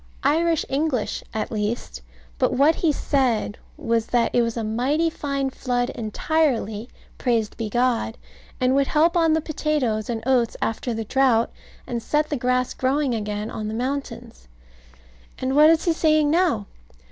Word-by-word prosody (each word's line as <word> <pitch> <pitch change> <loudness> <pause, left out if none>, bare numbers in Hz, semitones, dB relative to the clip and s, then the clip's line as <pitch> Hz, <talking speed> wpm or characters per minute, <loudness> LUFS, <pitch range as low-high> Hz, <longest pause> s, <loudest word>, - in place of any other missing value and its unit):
Irish 330 +1 +2
English 275 -4 -1
at 220 - -3
least: 210 - -3 0.4
but - - +2
what 285 +5 +4
he 330 -1 +1
said 255 -8 0 0.2
was, 230 -1 0
that 240 -1 +1
it 245 - +4
was 230 0 -1
a 230 - -2
mighty 270 +10 0
fine 275 -3 -2
flood 245 -1 -1
entirely, 230 -2 -1 0.3
praised 230 -4 0
be 225 -2 -4
God; 240 -1 0 0.4
and 255 0 +2
would 275 0 +2
help 325 +3 +3
on 330 -2 +4
the 320 - +2
potatoes 290 -9 -1
and 225 -2 -3
oats 250 -3 +2
after 225 +2 -2
the 225 0 -4
drought, 245 -1 +2 0.3
and 235 -1 -3
set 300 +5 0
the - - +1
grass 250 0 0
growing 270 0 0
again 210 -1 -3
on 215 -1 -4
the 215 - -4
mountains. 250 - -5 0.9
And 260 +1 -2
what 300 +1 +7
is 330 0 +3
he 340 - +3
saying 310 -2 +3
now? 325 - +2
255 Hz, 160 wpm, -23 LUFS, 225-300 Hz, 0.9 s, what